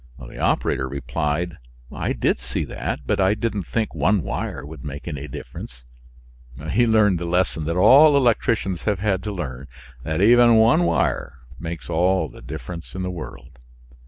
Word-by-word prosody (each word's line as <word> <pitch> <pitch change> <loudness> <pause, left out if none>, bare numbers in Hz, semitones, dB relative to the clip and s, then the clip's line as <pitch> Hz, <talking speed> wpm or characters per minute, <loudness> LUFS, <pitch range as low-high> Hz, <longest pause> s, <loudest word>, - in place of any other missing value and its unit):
The - - -11
operator 65 +1 0
replied, 75 +4 -3 0.3
"I - - -2
did - - 0
see 60 +1 -3
that, - - -4
but 105 - 0
I 95 +2 +3
didn't 105 -4 -3
think 110 -2 -2
one 100 -3 +1
wire - - -4
would 75 -2 -10
make 70 +2 -7
any 75 -3 -5
difference." 60 -2 -9 0.9
He 120 +3 +3
learned 105 -5 +3
the 85 - -4
lesson 85 -2 0
that 85 +2 -1
all 145 +9 +7
electricians 115 - +1
have 105 -2 +1
had 95 -1 0
to 105 +2 -4
learn 70 -8 -6 0.3
that 80 +5 -3
even 120 +3 +6
one 115 +10 +5
wire 70 - 0 0.2
makes 85 0 -6
all 90 +3 +1
the - - -14
difference 85 +8 -8
in 95 - -3
the 90 - -3
world. 65 -5 -9
90 Hz, 165 wpm, -22 LUFS, 75-105 Hz, 0.9 s, all